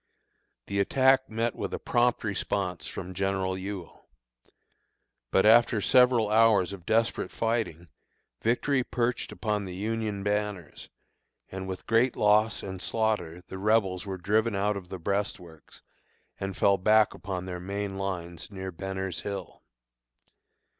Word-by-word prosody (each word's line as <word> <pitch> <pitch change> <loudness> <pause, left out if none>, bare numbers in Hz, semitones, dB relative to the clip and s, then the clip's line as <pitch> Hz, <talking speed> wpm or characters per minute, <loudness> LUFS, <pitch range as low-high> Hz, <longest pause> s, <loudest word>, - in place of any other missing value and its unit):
The 100 0 -2
attack 130 +5 +3
met 115 +1 -1
with - - -4
a - - -3
prompt 120 0 +1
response 95 -3 -2
from 90 +1 -6
General 95 0 -1
Ewell. 95 -2 -7 1.2
But 95 - +3
after 115 0 +6
several 120 -1 +4
hours 105 -4 +4
of 90 -3 -11
desperate 115 +1 +1
fighting, 110 -7 -2 0.5
victory 130 +3 +1
perched 120 0 -1
upon 105 -2 -2
the 90 -2 -6
Union 105 0 -2
banners, 105 -5 -3 0.6
and 95 0 -5
with 95 -1 -6
great 115 +3 +3
loss 105 +1 +3
and 95 -1 -6
slaughter 95 -7 -1
the 95 - -7
Rebels 100 -2 +1
were 95 -1 -4
driven 105 +4 +1
out 105 +1 +1
of 95 -3 -7
the 95 - -5
breastworks, 90 -3 -4 0.6
and 95 -1 -4
fell 100 -1 +3
back 110 +2 +4
upon 95 -2 -5
their 90 -1 -5
main 100 +2 -4
lines 85 -4 -4
near 95 -2 -6
Benner's 95 0 -4
Hill. 100 -3 -6
100 Hz, 135 wpm, -28 LUFS, 95-110 Hz, 1.2 s, after